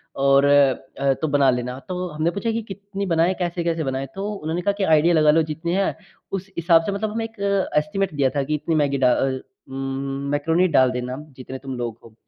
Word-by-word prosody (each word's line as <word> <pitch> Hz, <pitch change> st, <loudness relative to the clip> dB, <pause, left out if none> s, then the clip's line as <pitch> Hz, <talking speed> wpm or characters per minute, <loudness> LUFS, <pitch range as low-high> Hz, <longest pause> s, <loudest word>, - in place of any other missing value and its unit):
और 140 Hz, 0 st, +4 dB
अ, 140 Hz, -1 st, +2 dB
तो 155 Hz, +4 st, -3 dB
बना 140 Hz, -2 st, +3 dB
लेना। 125 Hz, +1 st, -3 dB
तो 180 Hz, 0 st, -3 dB
हमने 155 Hz, +2 st, -1 dB
पूछा 205 Hz, +5 st, -2 dB
कि, 230 Hz, +1 st, -1 dB
कितनी 200 Hz, -1 st, -6 dB
बनाए 170 Hz, 0 st, +2 dB
कैसे-कैसे 170 Hz, -2 st, -1 dB
बनाएँ। 135 Hz, 0 st, -2 dB
तो 195 Hz, +2 st, -3 dB
उन्होंने 165 Hz, -2 st, -3 dB
कहा 200 Hz, -, +2 dB
कि, 200 Hz, -, 0 dB
"आइडिया 160 Hz, 0 st, +4 dB
लगा 155 Hz, -2 st, +5 dB
लो 165 Hz, +2 st, +4 dB
जितनी 160 Hz, +2 st, -3 dB
है 195 Hz, +1 st, +1 dB, 0.4 s
उस 195 Hz, 0 st, -4 dB
हिसाब 165 Hz, -1 st, +4 dB
से" -, -, -1 dB
मतलब 210 Hz, +2 st, -2 dB
हमें 225 Hz, +1 st, -2 dB
एक 225 Hz, -1 st, -12 dB
अ, 200 Hz, -4 st, 0 dB
एस्टिमेट 195 Hz, +2 st, -2 dB
दिया 140 Hz, -2 st, +2 dB
था 140 Hz, -, +1 dB
कि 150 Hz, +3 st, -1 dB
इतनी 160 Hz, +2 st, -1 dB
मैगी 145 Hz, -2 st, +2 dB
डा 130 Hz, -2 st, +4 dB
अ, 130 Hz, -1 st, 0 dB, 0.3 s
उम 135 Hz, 0 st, -5 dB, 0.5 s
मैकरोनी 165 Hz, +5 st, +2 dB
डाल 130 Hz, -6 st, +4 dB
देना 125 Hz, 0 st, -4 dB, 0.2 s
जितने 130 Hz, +1 st, -7 dB
तुम 135 Hz, -1 st, -6 dB
लोग 120 Hz, -2 st, -4 dB
हो। 115 Hz, -, -15 dB
160 Hz, 220 wpm, -22 LUFS, 135-190 Hz, 0.5 s, लगा